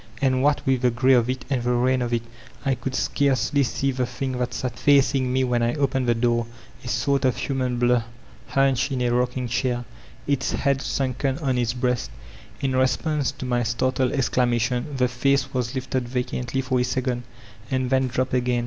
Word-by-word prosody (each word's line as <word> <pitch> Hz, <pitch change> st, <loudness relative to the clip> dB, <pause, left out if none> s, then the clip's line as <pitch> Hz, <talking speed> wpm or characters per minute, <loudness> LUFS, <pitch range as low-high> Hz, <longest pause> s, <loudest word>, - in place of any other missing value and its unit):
And 130 Hz, -2 st, +2 dB
what 145 Hz, +1 st, +2 dB
with 130 Hz, -2 st, +2 dB
the 125 Hz, -, +4 dB
gray 130 Hz, +3 st, +3 dB
of 120 Hz, -1 st, +3 dB
it 130 Hz, 0 st, -3 dB
and 130 Hz, -3 st, 0 dB
the 120 Hz, +1 st, 0 dB
rain 125 Hz, +1 st, +2 dB
of 120 Hz, -1 st, -2 dB
it, 120 Hz, -1 st, 0 dB, 0.4 s
I 135 Hz, -, +2 dB
could 130 Hz, +1 st, -4 dB
scarcely 140 Hz, +1 st, +1 dB
see 135 Hz, +2 st, 0 dB
the 125 Hz, -1 st, -1 dB
thing 130 Hz, +2 st, -4 dB
thai 125 Hz, 0 st, 0 dB
sat 125 Hz, -2 st, -4 dB
facing 135 Hz, -2 st, +3 dB
me 130 Hz, +1 st, +2 dB
when 125 Hz, -2 st, +1 dB
I 115 Hz, +3 st, +1 dB
opened 135 Hz, -3 st, 0 dB
the 120 Hz, -, +3 dB
door, 120 Hz, 0 st, +1 dB, 0.2 s
— -, -, -23 dB
a -, -, -8 dB
sort 135 Hz, +4 st, +1 dB
of 130 Hz, -1 st, +2 dB
human 130 Hz, -3 st, -1 dB
blur, 120 Hz, -1 st, +3 dB, 0.4 s
hunched 135 Hz, 0 st, +2 dB
in 130 Hz, -2 st, -1 dB
a 120 Hz, -, +1 dB
rocking 125 Hz, +1 st, 0 dB
chair, 120 Hz, 0 st, -1 dB, 0.4 s
its 140 Hz, -2 st, 0 dB
head 140 Hz, -1 st, +1 dB
sunken 135 Hz, 0 st, -1 dB
on 135 Hz, -5 st, 0 dB
its 120 Hz, -1 st, 0 dB
breast 125 Hz, -1 st, -1 dB, 0.5 s
In 135 Hz, -2 st, 0 dB
response 135 Hz, +2 st, +1 dB
to -, -, -7 dB
my 120 Hz, -1 st, +1 dB
startled 125 Hz, +3 st, 0 dB
exclamation, 125 Hz, -1 st, +1 dB
the 125 Hz, -1 st, +3 dB
face 135 Hz, +3 st, +1 dB
was 125 Hz, -1 st, -2 dB
lifted 130 Hz, -1 st, -2 dB
vacantly 125 Hz, +1 st, -2 dB
for 130 Hz, -1 st, 0 dB
a -, -, +2 dB
second, 125 Hz, -1 st, -1 dB, 0.5 s
and 130 Hz, -1 st, -1 dB
then 130 Hz, 0 st, +3 dB
dropped 130 Hz, +1 st, -1 dB
again. 125 Hz, -1 st, +1 dB
130 Hz, 200 wpm, -24 LUFS, 120-135 Hz, 0.5 s, the